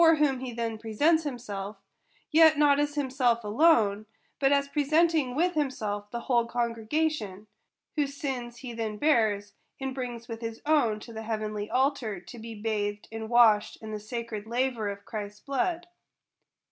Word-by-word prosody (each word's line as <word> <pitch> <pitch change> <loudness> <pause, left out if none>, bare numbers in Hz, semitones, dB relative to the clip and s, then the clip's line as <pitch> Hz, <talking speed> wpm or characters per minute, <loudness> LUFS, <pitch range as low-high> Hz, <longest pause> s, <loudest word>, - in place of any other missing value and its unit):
15 325 -2 +6
whom 270 -3 0
he 255 -1 -5
then 230 -2 -3
presents 295 +10 +2
himself; 210 -7 -5 0.5
yet 315 -1 +7
not 290 -1 +5
as 290 0 0
himself 255 -4 +1
alone, 215 -4 +3 0.3
but 275 -1 +3
as 280 0 +3
presenting 305 -2 +2
with 355 +4 +2
himself 215 -9 -2
the 235 +1 -4
whole 235 -1 +2
congre 235 -2 -2
gation; 295 -11 -1 0.5
whose 285 -2 -1
sins 245 -4 -4
he 240 0 -7
then 220 -2 -3
bears, 215 -8 +2 0.3
and 265 -1 -3
brings 240 -3 -5
with 230 -1 -6
his 225 -1 -5
own 280 -9 +3
to 230 +2 -11
the 220 - -5
heavenly 215 -2 -3
altar, 255 -6 0
to 205 +7 -11
be 225 0 -8
bathed 210 -1 -2
and 220 0 -5
washed 225 -3 +5
in 220 -1 -8
the 215 - -4
sacred 220 -1 -5
laver 240 -2 0
of 200 0 -7
Christ's 210 -1 -6
blood. 345 +5 -1
235 Hz, 165 wpm, -28 LUFS, 215-280 Hz, 0.5 s, yet